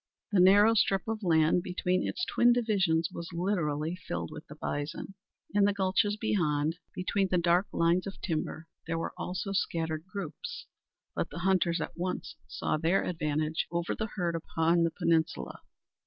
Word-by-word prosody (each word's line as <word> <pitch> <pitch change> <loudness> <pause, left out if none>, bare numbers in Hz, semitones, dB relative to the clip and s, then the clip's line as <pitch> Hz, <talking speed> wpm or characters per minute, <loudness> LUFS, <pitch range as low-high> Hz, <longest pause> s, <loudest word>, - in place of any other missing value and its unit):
The 200 - +3
narrow 205 +4 +7
strip 195 -3 +2
of 225 0 -2
land 165 -1 +3
between 180 0 0
its 360 - -2
twin 240 0 +4
divisions 195 -9 +1
was 170 0 -6
literally 170 -3 -1
filled 85 - -5
with - - -9
the - - -10
bison. 145 +6 -4 0.4
In 205 -1 +4
the 205 - +3
gulches 200 +2 +1
beyond, 160 -7 0 0.2
between 195 +2 0
the 180 - +2
dark 175 +3 +3
lines 170 +3 +2
of 195 - -7
timber, 160 -1 -3 0.2
there 165 0 -1
were 165 - -3
also 185 +2 -4
scattered 165 -4 -1
groups; 210 - -6 0.5
but - - -2
the 170 - -7
hunters 180 -3 +2
at - - -4
once 180 +1 -4
saw - - -1
their 165 +4 +2
advantage 155 -1 -1
over 170 0 -1
the 220 - -3
herd 175 -4 0
upon 165 +1 +1
the 165 - +3
peninsula. 160 - 0
175 Hz, 165 wpm, -30 LUFS, 160-195 Hz, 0.5 s, narrow